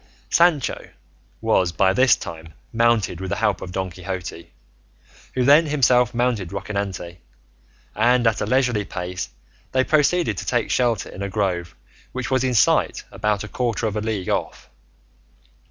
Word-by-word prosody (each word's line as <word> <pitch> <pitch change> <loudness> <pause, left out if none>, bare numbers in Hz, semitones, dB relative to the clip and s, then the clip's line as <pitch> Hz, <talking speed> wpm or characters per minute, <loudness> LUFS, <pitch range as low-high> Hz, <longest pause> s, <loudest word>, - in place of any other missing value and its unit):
Sancho 170 -6 +2 0.5
was 100 -6 +2
by 95 +3 +2
this 130 +3 +5
time 80 -1 -9 0.2
mounted 115 -6 +2
with 95 - -4
the - - -1
help 105 -4 0
of 90 - -7
Don 95 0 -3
Quixote, 90 -1 -7 0.8
who 130 - +1
then 150 +4 +6
himself 125 -4 +3
mounted 120 -7 0
Rocinante, 100 -3 -4 0.8
and 120 +3 +3
at 115 -1 +2
a - - -1
leisurely 125 -5 +2
pace 90 -1 -5 0.4
they 130 0 +3
proceeded 150 - +2
to - - -6
take 120 -2 0
shelter 120 -5 +1
in 95 - -9
a 100 - -3
grove 90 -4 -2 0.4
which 130 0 -4
was 130 -1 +2
in 130 -1 0
sight 110 - +3
about 105 -1 -1
a - - -6
quarter 120 0 -2
of 110 -1 -2
a 105 - -1
league 105 -4 -3
off. - - -3
110 Hz, 155 wpm, -22 LUFS, 95-125 Hz, 0.8 s, then